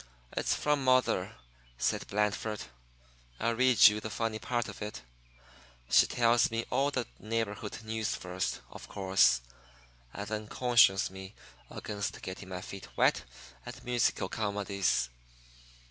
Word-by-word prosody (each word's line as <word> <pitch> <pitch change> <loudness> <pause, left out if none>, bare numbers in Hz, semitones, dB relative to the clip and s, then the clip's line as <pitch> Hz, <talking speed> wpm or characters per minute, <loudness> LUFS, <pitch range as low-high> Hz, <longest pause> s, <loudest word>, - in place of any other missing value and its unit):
"It's - - +1
from 150 -2 +1
mother," 130 0 +2 0.4
said - - -1
Blandford. 105 +1 -1 0.8
"I'll 115 +1 +1
read 125 0 +7
you 105 0 +2
the 110 - -6
funny 110 0 -2
part 120 -1 -1
of - - -9
it. 105 - -6 0.9
She - - +7
tells 115 -1 +3
me 115 +1 -2
all 135 +3 +2
the 130 -4 -2
neighborhood 110 -1 -3
news 110 -1 -2
first, 90 0 -3
of - - -10
course, 95 -11 +3 0.7
and - - -6
then 110 0 -4
cautions 115 -7 +4
me 95 +1 -10 0.3
against 100 -2 -4
getting 95 +1 -7
my 90 -1 -5
feet 100 - -8
wet - - +3 0.4
and - - -9
musical 120 -1 +1
comedies. 100 - 0
110 Hz, 130 wpm, -31 LUFS, 100-115 Hz, 0.9 s, read